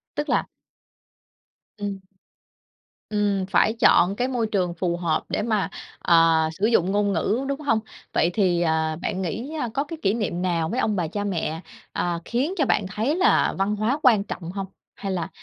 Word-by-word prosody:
Tức 295 Hz, 0 st, -2 dB
là -, -, +2 dB, 1.3 s
Ừm. 200 Hz, -1 st, -4 dB, 1.1 s
Ừm, 205 Hz, -3 st, 0 dB
phải 195 Hz, +3 st, +3 dB
chọn 195 Hz, -5 st, +5 dB
cái 250 Hz, +4 st, 0 dB
môi 245 Hz, -4 st, -1 dB
trường 185 Hz, -5 st, 0 dB
phù 170 Hz, 0 st, -1 dB
hợp 165 Hz, -3 st, 0 dB
để -, -, -1 dB
mà, 215 Hz, -2 st, 0 dB, 0.3 s
ờ, 165 Hz, -1 st, +5 dB, 0.2 s
sử 205 Hz, -, +2 dB
dụng 190 Hz, -5 st, +3 dB
ngôn 205 Hz, 0 st, +1 dB
ngữ, 215 Hz, +10 st, 0 dB
đúng 280 Hz, +1 st, -2 dB
hông? 230 Hz, -7 st, +2 dB, 0.3 s
Vậy 170 Hz, -, +3 dB
thì, 180 Hz, -4 st, +2 dB
à, 160 Hz, -1 st, +1 dB
bạn 190 Hz, -3 st, -2 dB
nghĩ, 230 Hz, -, -4 dB
a, 245 Hz, -, -1 dB
có 275 Hz, -, 0 dB
cái 325 Hz, +2 st, -7 dB
kỷ 195 Hz, -, +2 dB
niệm 200 Hz, -6 st, -2 dB
nào 170 Hz, -3 st, 0 dB
với 245 Hz, -, -1 dB
ông 210 Hz, -, +1 dB
bà, 175 Hz, -3 st, 0 dB
cha 205 Hz, +6 st, -3 dB
mẹ, 165 Hz, -5 st, -2 dB, 0.3 s
à, 175 Hz, -1 st, -1 dB
khiến 265 Hz, +9 st, -1 dB
cho 295 Hz, -, +2 dB
bạn 205 Hz, -, +1 dB
thấy 225 Hz, +11 st, 0 dB
là 365 Hz, -, +3 dB
văn 195 Hz, +2 st, +1 dB
hóa 225 Hz, +8 st, 0 dB
quan 225 Hz, -7 st, +5 dB
trọng 175 Hz, -4 st, -6 dB
hông? 195 Hz, 0 st, -4 dB, 0.3 s
Hay 195 Hz, -1 st, -4 dB
là, 180 Hz, -3 st, -2 dB
200 Hz, 190 wpm, -24 LUFS, 175-230 Hz, 1.3 s, chọn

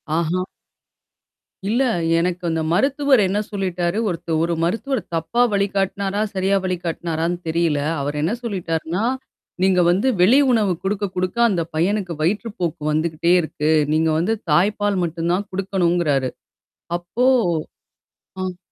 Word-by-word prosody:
ஆஹா! 170 Hz, +2 st, 0 dB, 1.2 s
இல்ல. 240 Hz, +5 st, +2 dB, 0.3 s
எனக்கு 180 Hz, +1 st, -1 dB
அந்த 160 Hz, 0 st, 0 dB
மருத்துவர் 275 Hz, -, +3 dB
என்ன 200 Hz, +3 st, 0 dB
சொல்லிட்டாரு, 180 Hz, -2 st, -1 dB
ஒருத்த 165 Hz, -1 st, -5 dB
ஒரு 170 Hz, +1 st, +1 dB
மருத்துவர் 225 Hz, +7 st, -1 dB
தப்பா 165 Hz, +9 st, 0 dB
வழிகாட்டுனாரா! 200 Hz, 0 st, 0 dB
சரியா 195 Hz, +1 st, +1 dB
வழிகாட்னாரான்னு 170 Hz, -1 st, -2 dB
தெரியல. 160 Hz, -2 st, +1 dB, 0.2 s
அவர் 145 Hz, +1 st, -3 dB
என்ன 165 Hz, +8 st, 0 dB
சொல்லிட்டார்ன்னா, 180 Hz, -3 st, -2 dB, 0.6 s
நீங்க 185 Hz, -1 st, +4 dB
வந்து 190 Hz, +8 st, +2 dB
வெளி 230 Hz, +10 st, +6 dB
உணவு 210 Hz, -6 st, +2 dB
குடுக்க, 200 Hz, +1 st, -1 dB
குடுக்க 185 Hz, +5 st, -2 dB
அந்த 185 Hz, -5 st, 0 dB
பையனுக்கு 185 Hz, +2 st, 0 dB
வயிற்றுப்போக்கு 180 Hz, -2 st, -2 dB
வந்துகிட்டே 160 Hz, +2 st, +1 dB
இருக்கு. 155 Hz, -1 st, -1 dB, 0.2 s
நீங்க 160 Hz, +1 st, +2 dB
வந்து 205 Hz, +7 st, +1 dB, 0.2 s
தாய்ப்பால் 205 Hz, +2 st, +2 dB
மட்டும் 170 Hz, +1 st, -2 dB
தான் 200 Hz, +3 st, -1 dB
குடுக்கணுங்கிறாரு. 175 Hz, -8 st, +1 dB, 0.7 s
அப்போ 225 Hz, +9 st, -1 dB, 1.2 s
ஆ. 180 Hz, -1 st, -5 dB
180 Hz, 120 wpm, -21 LUFS, 165-200 Hz, 1.2 s, வெளி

